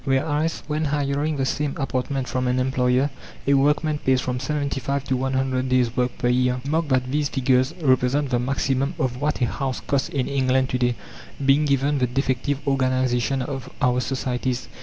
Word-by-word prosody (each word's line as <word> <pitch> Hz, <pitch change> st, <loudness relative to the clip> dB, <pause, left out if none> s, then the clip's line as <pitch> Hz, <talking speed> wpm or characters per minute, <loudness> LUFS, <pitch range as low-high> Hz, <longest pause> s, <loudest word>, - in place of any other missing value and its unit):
Whereas 150 Hz, +4 st, 0 dB
when 155 Hz, +1 st, -1 dB
hiring 145 Hz, +1 st, 0 dB
the 135 Hz, -, 0 dB
same 145 Hz, +1 st, -1 dB
apartment 135 Hz, -1 st, -2 dB
from 130 Hz, 0 st, -1 dB
an 125 Hz, 0 st, +1 dB
employer, 130 Hz, +1 st, +1 dB, 0.3 s
a 140 Hz, -, +3 dB
workman 150 Hz, +2 st, +2 dB
pays 130 Hz, -2 st, +2 dB
from 125 Hz, -1 st, -2 dB
75 140 Hz, -1 st, -2 dB
to 135 Hz, -, -1 dB
100 130 Hz, 0 st, 0 dB
days' 125 Hz, -2 st, +2 dB
work 125 Hz, -1 st, 0 dB
per 125 Hz, -, 0 dB
year. 125 Hz, 0 st, +2 dB
Mark 160 Hz, +2 st, 0 dB
that 130 Hz, -2 st, +1 dB
these 145 Hz, 0 st, 0 dB
figures 130 Hz, +3 st, +1 dB
represent 130 Hz, +1 st, +2 dB
the 120 Hz, -, +2 dB
maximum 135 Hz, +3 st, 0 dB
of 130 Hz, -4 st, -2 dB
what 150 Hz, -1 st, 0 dB
a -, -, +4 dB
house 130 Hz, +2 st, -3 dB
costs 140 Hz, -1 st, -1 dB
in 135 Hz, -3 st, -1 dB
England 130 Hz, -1 st, +1 dB
to 125 Hz, -, -1 dB
day, 120 Hz, -1 st, +1 dB, 0.5 s
being 140 Hz, +3 st, +4 dB
given 140 Hz, 0 st, +1 dB
the 125 Hz, -, +2 dB
defective 135 Hz, +2 st, -1 dB
organization 130 Hz, -1 st, +1 dB
of 135 Hz, 0 st, -5 dB
our 125 Hz, -2 st, +2 dB
societies. 125 Hz, 0 st, -2 dB
130 Hz, 180 wpm, -23 LUFS, 125-140 Hz, 0.5 s, a